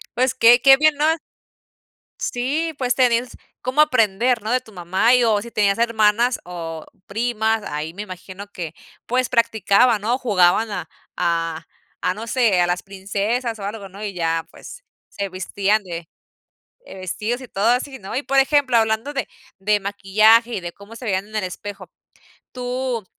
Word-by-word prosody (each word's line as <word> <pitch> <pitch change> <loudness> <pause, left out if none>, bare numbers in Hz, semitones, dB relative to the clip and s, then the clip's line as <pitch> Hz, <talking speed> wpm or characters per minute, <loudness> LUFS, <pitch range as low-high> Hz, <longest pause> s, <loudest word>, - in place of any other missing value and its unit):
Pues 255 0 +2
que 240 +2 +6
que 270 +1 +8
bien, 310 +1 +4
¿no? 295 +1 +1 1.2
Sí, 290 +7 -1
pues 250 -2 +1
tenías 245 -1 +1 0.2
cómo 255 +4 0
aprender, 235 -3 +3
¿no? 220 +3 -2
De 255 - +3
tu 225 -4 -18
mamá, 185 +5 +1
y 250 -1 +4
o 215 -3 +2
si 235 - -9
tenías 200 -2 +1
hermanas 230 +1 +2
o 165 -3 -7 0.2
primas, 220 0 0
ahí 150 +2 -4
me 205 - -5
imagino 185 0 -9
que, 165 -3 -6 0.3
pues, 255 +1 0
practicaban, 225 -1 +3
¿no? 235 +4 0
Jugaban 210 -2 +3
a 190 -3 -5 0.3
a 165 -2 -1 0.3
a 185 - 0
no 220 +3 -7
sé, 230 -8 +3
a 175 - +3
las 175 0 -1
princesas 205 +5 -2
o 200 - -7
algo, 200 0 -6
¿no? 200 +3 -9
Y 200 -2 -4
ya, 165 -2 -1
pues, - - -12 0.2
se 200 - -4
vestían 200 +3 0
de 170 -3 -7 0.8
de - - -11
vestidos 210 +6 -3
y 255 - -10
todo 200 -1 -1
así, 260 +3 0
¿no? 195 -4 -8
Y, 270 - 0
por 275 - +1
ejemplo, 270 -2 +3
hablando 220 +4 +1
de 270 - -2 0.3
de 210 +2 +2
maquillaje 215 +4 +3
y - - -3
de 175 -1 -6
cómo 200 +5 -14
se 250 - -10
veían 195 0 -1
en 215 - -7
el 210 - -1
espejo. 190 0 -7 0.6
Tú, 250 -2 -3
215 Hz, 175 wpm, -21 LUFS, 190-245 Hz, 1.2 s, que